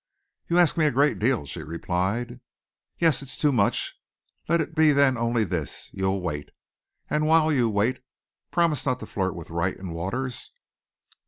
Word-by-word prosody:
"You 170 - +1
ask 175 -2 +4
me 155 -2 +4
a - - +2
great 140 +4 +2
deal," 115 - +1
she 80 +3 -6
replied. 95 - -2 0.6
"Yes, 160 -5 +3
it's 135 -1 -6
too 150 - +2
much. 115 -7 0 0.5
Let 170 +1 +3
it 160 - -2
be 155 -1 +5
then 140 -2 +4
only 115 -1 +1
this 90 -7 -4
you'll 95 0 -1
wait. 75 -4 -4 0.6
And 150 0 0
while 160 -1 +4
you 120 -5 +2
wait, 110 +5 0 0.5
promise 170 -4 +1
not 130 -2 0
to - - -5
flirt 95 -3 -2
with 85 -1 -9
Wright 85 +2 -1
and 90 -3 -7
Waters." 120 +10 -4
120 Hz, 170 wpm, -25 LUFS, 95-145 Hz, 0.6 s, be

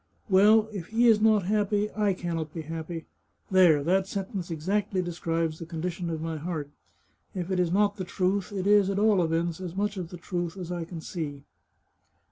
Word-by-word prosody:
Well, 210 +3 +6
if 185 -5 -5
he 230 +2 +2
is 220 -2 +5
not 215 -2 +4
happy, 210 +1 +1
I 210 -2 +2
can 175 -2 -3
not 160 -1 -4
be 165 - -4
happy. 165 +1 -6 0.5
There; 175 -6 +5
that 190 +4 +2
sentence 195 -2 -4
ex 160 0 -6
actly 195 -2 +1
describes 165 -2 -2
the 165 - -7
condition 170 +1 -4
of 160 -1 -3
my 165 -1 -3
heart. 155 -2 -4 0.6
If 180 0 -3
it 185 - +1
is 175 -2 +1
not 205 +2 +2
the 190 - -3
truth, 185 +2 -1
it 195 -2 -3
is, 205 -1 +5
at 195 - -1
all 210 -2 +4
events, 165 +1 -1
as 180 -1 -6
much 205 +1 -1
of 175 -3 -4
the 180 - -8
truth 175 +1 -4
as 180 -2 -6
I 175 -2 -3
can 170 -1 -8
see." 145 -5 -5
180 Hz, 205 wpm, -27 LUFS, 165-200 Hz, 0.6 s, Well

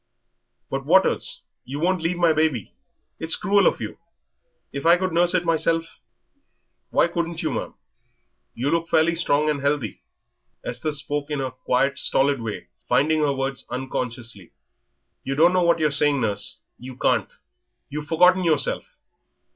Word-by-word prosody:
"But, - - -2
Waters, - - +2 0.2
you 140 +3 -6
won't 180 +2 +1
leave 170 +2 -1
my 170 -2 +4
baby. 155 -9 0 0.5
It's 160 0 +2
cruel 200 -1 +3
of - - +1
you. - - -6 0.7
If 140 0 -4
I 170 +1 +6
could 185 0 -2
nurse 175 +1 +3
it 175 -1 +1
myself 165 0 0 0.5
" - - -50
"Why - - +3
couldn't 170 -1 -3
you, 155 - -1
ma'am? - - -4 0.8
You 135 +5 -1
look 165 0 0
fairly 160 +1 +3
strong 155 -3 +1
and 150 -2 0
healthy." 140 -7 -1 0.6
Esther 125 +5 -3
spoke 145 0 -3
in 150 - -2
her 135 -1 -3
quiet, 130 +2 0
stolid 140 -1 +1
way, 110 -2 -6 0.2
finding 155 +2 +3
her 145 -2 +2
words 135 -1 -3
unconsciously. 120 -6 -4 0.7
"You 135 - -3
don't 170 +5 +5
know 185 - +3
what 170 -1 +3
you're 155 -2 +1
saying, 145 0 +3
nurse; 100 -1 -2 0.2
you 130 +1 -10
can't.... - - +1 0.6
You've 150 +1 -6
forgotten 180 +4 +4
yourself. 160 -4 0
150 Hz, 155 wpm, -23 LUFS, 135-170 Hz, 0.8 s, I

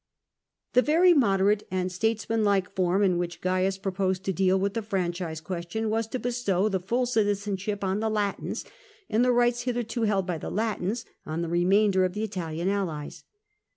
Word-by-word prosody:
The 250 - +6
very 340 +6 +5
moderate 205 - +2
and 185 0 -1
statesmanlike 210 -1 0
form 185 +2 +1
in 180 -3 +2
which 170 -1 -4
Oaius 185 +1 0
proposed 190 -1 -1
to 195 - -1
deal 190 +1 +2
with 200 +1 0
the 230 - -2
franchise 180 -5 -2
question 185 +6 -3
was 225 0 0
to 255 - -3
bestow 235 -6 0
the 190 -2 0
full 235 +8 0
citizenship 205 -3 -1
on 190 +1 0
the 220 0 0
Latins, 210 -2 -2 0.5
and 220 +3 +3
the 250 - +4
rights 240 0 +2
hitherto 240 -2 -2
held 205 -4 +1
by 175 -3 -3
the - - -5
Latins 220 0 -2 0.2
on 160 +2 -3
the 170 - -3
remainder 190 +3 +3
of 185 -1 -1
the 210 - -2
Italian 175 -5 -3
allies. 180 -7 -3
195 Hz, 175 wpm, -27 LUFS, 185-220 Hz, 0.5 s, The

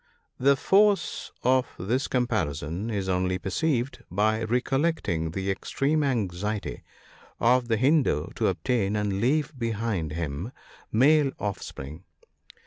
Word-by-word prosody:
The 140 +2 +5
force 200 +7 +2
of 130 +1 +3
this 120 +9 -1
comparison 95 - -1
is 100 -4 -2
only 90 0 +1
perceived 120 - -1
by 110 +4 +1
recollecting 125 - 0
the 95 +3 -2
extreme 145 +9 0
anxiety 105 -5 -2 0.6
of 125 +1 +3
the 115 -2 +1
Hindoo 130 - +2
to - - 0
obtain, 100 +3 0
and 100 -2 -1
leave 150 +4 +1
behind 110 -9 -2
him, 85 - -4 0.4
male 140 +4 +4
offspring. 90 -6 -6
110 Hz, 115 wpm, -26 LUFS, 95-130 Hz, 0.6 s, The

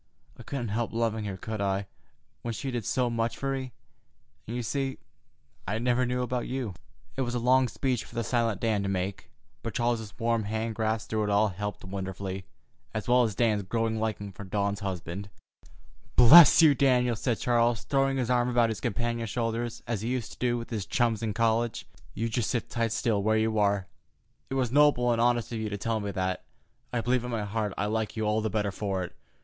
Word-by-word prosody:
I - - -12
couldn't 125 -5 -4
help 115 +3 -2
loving 110 -2 0
her, 100 -2 -4
could 110 +2 -5
I, 100 0 0 0.6
when 115 -1 -4
she 135 +5 -4
did 120 -4 -3
so 125 +4 +1
much 115 -1 -1
for 135 0 -1
me? 130 -1 -4 0.8
And, 115 - -4
you 120 - -2
see, 135 +3 -2 0.7
I 105 - -1
never 125 +2 +1
knew 125 0 0
about 125 -1 -2
you." 125 -6 -3 0.4
It 135 - -1
was 120 -1 -1
a - - +1
long 130 +2 +4
speech 125 +1 -1
for - - -15
the 115 - 0
silent 115 -2 0
Dan 110 -3 +1
to 100 - -2
make, 95 0 -3 0.3
but - - -5
Charles's 115 -4 -1
warm 115 -2 0
hand 110 +2 -2
grasp 110 0 -1
through 110 -1 0
it - - -2
all 105 +1 +3
helped 105 +2 -5
wonderfully, 95 0 -5 0.5
as 110 - -3
well 125 +1 +5
as 110 -5 0
Dan's 110 -3 +2
growing 110 +3 -1
liking 105 -2 -2
for 100 - -9
Dawn's 100 +1 -1
husband. 95 0 -5 0.9
"Bless 155 +7 +9
you, 155 -2 +8
Daniel!" 125 -3 +3
said 115 +1 -1
Charles, 120 -2 +2
throwing 135 -1 +1
his 125 -2 0
arm 120 0 +2
about 120 -2 +3
his 110 - -4
companion's 115 -1 -2
shoulders, 115 +1 -2
as 115 -4 -2
he 115 - -2
used 125 -4 -2
to - - -13
do 120 -1 +1
with 115 0 -7
his 105 -4 -3
chums 115 -3 +1
in 110 -2 -1
college. 115 0 +1 0.3
"You 115 - -1
just 115 -1 -1
sit 120 - -3
right 115 -1 +1
still 110 -2 +1
where 110 +2 +2
you 110 0 +1
are. 100 -2 +2 0.6
It 135 - -3
was 125 -3 0
noble 140 -4 +4
and 115 -1 +1
honest 120 -1 +2
of 115 - -3
you 110 -1 -2
to 105 - -3
tell 115 +2 -1
me 100 -1 -3
that. 95 -1 -2 0.5
I 120 - 0
believe 125 +1 +1
in 125 - -4
my 115 -3 -2
heart 105 -1 -2
I - - 0
like 110 +1 -2
you 110 - 0
all 105 +1 +1
the 110 - -1
better 105 -1 0
for 95 -1 -2
it. 90 - -8
115 Hz, 215 wpm, -28 LUFS, 105-120 Hz, 0.9 s, Bless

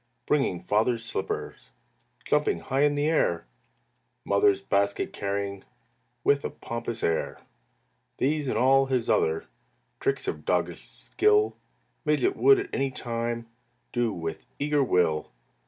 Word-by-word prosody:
Bringing 135 -12 +1
Father's 115 +4 +1
slippers, 115 - -4 0.6
Jumping 150 0 +2
high 135 +1 -1
in 145 0 +1
air, 145 - +1 0.8
Mother's 100 0 +3
basket 100 +1 0
carrying 100 -1 -3 0.6
With 140 0 +3
a - - -2
pompous 115 -1 -5
air. 80 -1 0 0.8
These 145 +1 0
and - - 0
all 135 +1 +4
his 130 -3 +1
other 435 -1 +1 0.5
Tricks 410 +1 -1
of - - -3
doggish - - -1
skill, 420 0 +2 0.5
Midget 150 - +2
would 410 -1 +6
at 395 - -6
any 135 0 +1
time 115 -2 -3 0.4
Do 120 -2 +1
with 80 -4 -5
eager 145 0 +2
will. 85 - +1
120 Hz, 120 wpm, -27 LUFS, 100-150 Hz, 0.8 s, would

